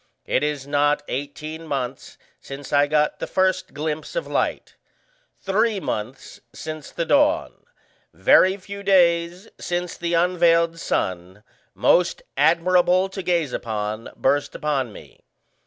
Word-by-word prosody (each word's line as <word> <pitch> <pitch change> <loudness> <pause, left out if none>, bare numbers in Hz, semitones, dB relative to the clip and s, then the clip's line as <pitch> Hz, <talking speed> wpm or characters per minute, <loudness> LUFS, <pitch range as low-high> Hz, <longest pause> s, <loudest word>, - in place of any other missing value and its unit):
It - - +1
is 150 -2 -2
not 145 +1 +1
eighteen 155 +4 -5
months 130 -3 -4 0.2
since 140 +1 -9
I 145 0 +4
got 150 0 +1
the - - -4
first 185 0 0
glimpse 155 - -4
of - - -1
light, - - -2 0.6
three 210 +2 +1
months 120 - -5
since 155 -1 -7
the 170 - -3
dawn, 300 - +2 0.6
very 190 +1 +4
few 200 +1 -9
days 175 0 +2
since 175 0 -3
the 170 0 -1
unveiled 170 -1 +3
sun, 95 - -3 0.3
most 175 -1 +2
admirable 180 +4 +3
to 190 0 -6
gaze 170 -7 0
upon, 110 0 -4
burst 145 +2 0
upon 140 -6 -1
me. - - -15
165 Hz, 125 wpm, -23 LUFS, 145-180 Hz, 0.6 s, I